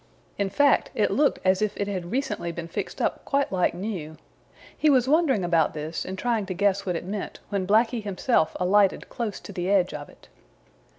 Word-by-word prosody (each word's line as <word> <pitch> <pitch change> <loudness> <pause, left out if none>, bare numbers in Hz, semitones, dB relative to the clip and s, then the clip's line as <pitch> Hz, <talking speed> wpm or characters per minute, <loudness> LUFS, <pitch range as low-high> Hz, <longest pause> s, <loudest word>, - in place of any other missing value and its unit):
In 200 -1 +1
fact, 285 +8 +3
it - - +2
looked 290 0 +2
as 185 +1 +3
if 215 -1 -1
it 200 - -1
had 185 -4 -4
recently 210 -7 -2
been 170 0 -6
fixed 170 - -5
up - - -1
quite 280 0 0
like 180 -2 +1
new. 175 -5 -5 0.6
He 310 - +2
was 260 -3 +4
wondering 285 - +3
about 165 -3 +2
this 155 +2 -4
and 190 +1 -5
trying 225 -3 -1
to 185 - -4
guess 200 +1 +1
what 180 - 0
it 165 - -4
meant, 200 +2 -5
when 195 -2 -2
Blacky 225 +3 +3
himself 200 -3 0
alighted 195 +2 +2
close 230 -5 -4
to 200 - -10
the 180 0 -2
edge 190 -2 +3
of 145 -1 -7
it. - - -19
200 Hz, 200 wpm, -25 LUFS, 180-225 Hz, 0.6 s, was